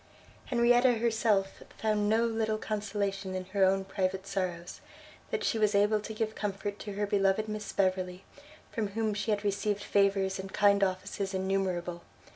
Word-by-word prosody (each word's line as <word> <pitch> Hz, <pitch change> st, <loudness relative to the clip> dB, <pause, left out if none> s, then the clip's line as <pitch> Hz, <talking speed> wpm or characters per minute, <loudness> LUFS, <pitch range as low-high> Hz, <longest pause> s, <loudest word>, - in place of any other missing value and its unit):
Henrietta 245 Hz, +1 st, +4 dB
herself 220 Hz, -4 st, +1 dB, 0.2 s
found 210 Hz, -1 st, +1 dB
no 225 Hz, +2 st, +3 dB
little 220 Hz, -1 st, 0 dB
consolation 200 Hz, -3 st, -3 dB
in 185 Hz, 0 st, -3 dB
her 195 Hz, +1 st, +1 dB
own 190 Hz, 0 st, +3 dB
private 190 Hz, 0 st, -2 dB
sorrows, 180 Hz, -3 st, -4 dB, 0.5 s
that 450 Hz, -2 st, -2 dB
she 225 Hz, -, 0 dB
was 210 Hz, -1 st, +3 dB
able 210 Hz, +1 st, +4 dB
to 215 Hz, -, -7 dB
give 220 Hz, 0 st, -1 dB
comfort 205 Hz, -1 st, -4 dB
to 205 Hz, -, -6 dB
her 205 Hz, +1 st, -1 dB
beloved 200 Hz, +1 st, +2 dB
Miss 215 Hz, 0 st, -4 dB
Beverley, 185 Hz, -1 st, 0 dB, 0.5 s
from 220 Hz, -2 st, -1 dB
whom 220 Hz, -1 st, +1 dB
she 205 Hz, +1 st, -3 dB
had 205 Hz, -1 st, +1 dB
received 205 Hz, 0 st, -1 dB
favours 195 Hz, -1 st, +2 dB
and 190 Hz, 0 st, -6 dB
kind 200 Hz, 0 st, +4 dB
offices 190 Hz, +1 st, -2 dB
innumerable. 185 Hz, -2 st, -1 dB
200 Hz, 160 wpm, -30 LUFS, 190-215 Hz, 0.5 s, Henrietta